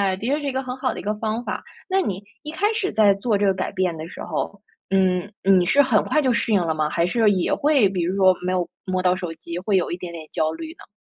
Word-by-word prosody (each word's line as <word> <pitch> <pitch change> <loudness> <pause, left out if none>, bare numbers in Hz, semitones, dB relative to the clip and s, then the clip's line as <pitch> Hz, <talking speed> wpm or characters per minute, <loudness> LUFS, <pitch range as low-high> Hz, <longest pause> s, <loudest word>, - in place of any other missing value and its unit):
的 210 +5 -5
确 275 - +2
是 295 - -8
一 275 - -2
个 265 +1 -1
很 255 0 -5
好 255 -1 -1
的 - - -6
一 - - -14
个 210 - -1
方 220 +2 -2
法。 - - -4 0.3
那 380 +1 +2
你 200 - -3 0.2
一 300 - -6
开 410 +6 +1
始 390 -3 -1
在 210 -2 +5
做 205 +1 0
这 205 - +1
个 195 - +4
改 185 - -3
变 185 -3 -1
的 155 +1 -6
时 - - -10
候， 200 - -4 0.3
嗯， 185 -1 +2 0.2
你 190 -2 +5
是 280 +10 +5
很 250 -6 +3
快 305 - +2
就 260 -3 +2
适 230 -1 0
应 195 - +4
了 160 -2 -1
吗？ 155 -1 0
还 170 +2 +1
是 215 +2 +3
也 185 -3 0
会 280 -9 +3
比 185 -2 -2
如 180 +3 -1
说 190 -2 +4
没 185 - 0
有 180 -2 0 0.2
摸 185 -1 -1
到 180 0 +3
手 180 -3 -5
机 170 +1 -7
会 195 +3 0
有 185 - +1
一 175 - -2
点 175 -1 -7
点 160 -2 -8
焦 155 0 0
虑 320 - -7
呢？ - - -16
195 Hz, 310 characters per minute, -23 LUFS, 180-240 Hz, 0.3 s, 在